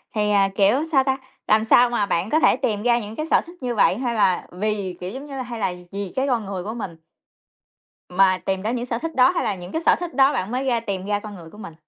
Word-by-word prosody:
thì, 210 0 +1
à, 195 -1 +3
kiểu, 200 +3 +4 0.2
sao 270 -2 +4
ta, 265 -1 0 0.3
làm 215 +1 +4
sao 240 +2 +5
mà 225 -4 0
bạn 185 +1 -1
có 315 - +3
thể - - +4
tìm 210 -2 -1
ra 240 0 +3
những 215 0 -7
cái 310 - -3
sở - - +5
thích 345 -4 -15
như 245 -1 -2
vậy 200 -2 +3
hay 240 -2 -2
là 185 -4 +2
vì, 195 -1 -3
kiểu 180 +1 -5
giống 265 +7 -7
như 280 -2 -8
là, 260 - -3
hay 235 -2 -7
là 190 -3 0 0.2
vì 200 -2 -5
cái 265 +1 0
con 235 -5 0
người 190 -2 -5
của 215 +3 -5
mình 195 -8 -6 1.1
mà 185 0 +3
tìm 190 0 -2
ra 220 - -1
những 245 0 -3
sở 235 -2 -2
thích 325 +3 -5
đó 255 0 +5
hay 350 - -1
là 210 -3 0
những 180 0 -10
cái 325 - -2
sở - - +6
thích 350 -1 -6
đó 275 +1 +5
bạn 195 -6 -2
mới 255 +2 -2
ra 240 -3 +1
tìm 195 -3 -4
ra 205 0 0
con 210 -1 -9
người 165 -3 -12
của 210 - -15
mình? 170 -7 -9
215 Hz, 290 wpm, -22 LUFS, 195-250 Hz, 1.1 s, sở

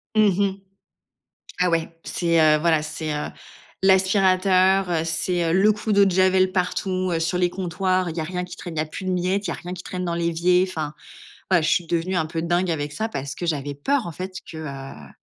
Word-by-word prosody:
Mmh 205 -3 +4
mh, 195 0 -1 1.0
ah 180 - +4
ouais, 165 0 -1
c'est, 170 -2 +1
heu, 155 -1 +5
voilà, 160 -1 +2
c'est, 155 0 -4
heu, 150 0 -2 0.6
l'aspirateur, 190 -1 +4
heu, 160 -2 +1
c'est 165 +1 0
le 195 +4 +5
coup 210 +1 -3
d'eau 200 0 +5
de - - +2
javel 185 0 +3
partout, 185 0 -1
heu, 165 - 0
sur 165 +2 0
les 180 0 +2
comptoirs, 185 0 -1
il 165 - -6
y - - -1
a - - -2
rien 180 +2 -3
qui 180 0 -10
traîne, 170 -3 -8
il - - -2
y - - +2
a - - -5
plus 170 +5 -8
de 185 - -1
miettes, 185 +3 0
il - - -5
y - - -1
a - - -5
rien 180 +1 -7
qui 180 - -8
traîne 180 0 -5
dans 170 - -1
l'évier. 170 +2 +2
Enfin, 155 -5 -4 0.6
voila, 175 -3 +4
je 155 - +1
suis 175 -2 +1
devenue 175 +2 -1
un 160 - +1
peu 160 +1 -4
dingue 175 +2 0
avec 150 -3 -2
ça 220 +8 -2
parce 140 -10 -5
que 175 - -5
j'avais 145 -3 -2
peur 245 - 0
en - - -5
fait 185 +3 -6
que, 160 - -8
heu, 135 - -8
175 Hz, 235 wpm, -23 LUFS, 160-185 Hz, 1.0 s, heu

